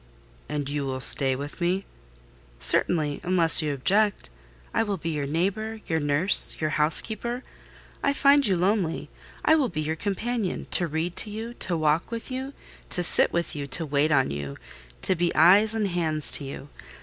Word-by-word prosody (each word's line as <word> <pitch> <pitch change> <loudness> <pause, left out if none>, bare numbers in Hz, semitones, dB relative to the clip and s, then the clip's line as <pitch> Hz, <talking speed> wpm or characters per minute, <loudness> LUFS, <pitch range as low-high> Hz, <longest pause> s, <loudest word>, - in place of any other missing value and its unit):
"And 145 -2 -4
you 145 0 -4
will 130 0 -5
stay 135 0 +3
with 145 +6 -9
me?" 185 +3 -1 0.7
"Certainly—unless 165 +2 +4
you 150 -1 -3
object. 200 - -1 0.4
I - - 0
will 205 -3 -3
be 165 0 -5
your 145 -2 -4
neighbour, 200 +8 -3
your 160 -1 -2
nurse, 145 +6 +4
your 155 -1 -2
housekeeper. 220 +11 -1 0.6
I 280 - 0
find 280 -1 +3
you 190 -3 0
lonely: 185 -2 -2 0.3
I - - +4
will 295 -5 +1
be 155 -3 -5
your 155 +1 -3
companion—to 200 -1 0
read 160 +3 -4
to 215 - -3
you, 225 +3 -7
to 180 -7 -4
walk 155 +1 -1
with 230 +3 -7
you, 265 +2 -6 0.4
to 180 - +3
sit - - +5
with 170 -2 -3
you, 145 -1 -6
to 160 +4 +3
wait 145 +1 0
on 135 -3 +1
you, 70 -1 -7 0.5
to - - +3
be 175 -1 -2
eyes 200 +7 +4
and 215 -2 -1
hands 160 -4 -1
to 145 - +1
you. 135 +1 -10
170 Hz, 175 wpm, -24 LUFS, 150-210 Hz, 0.7 s, sit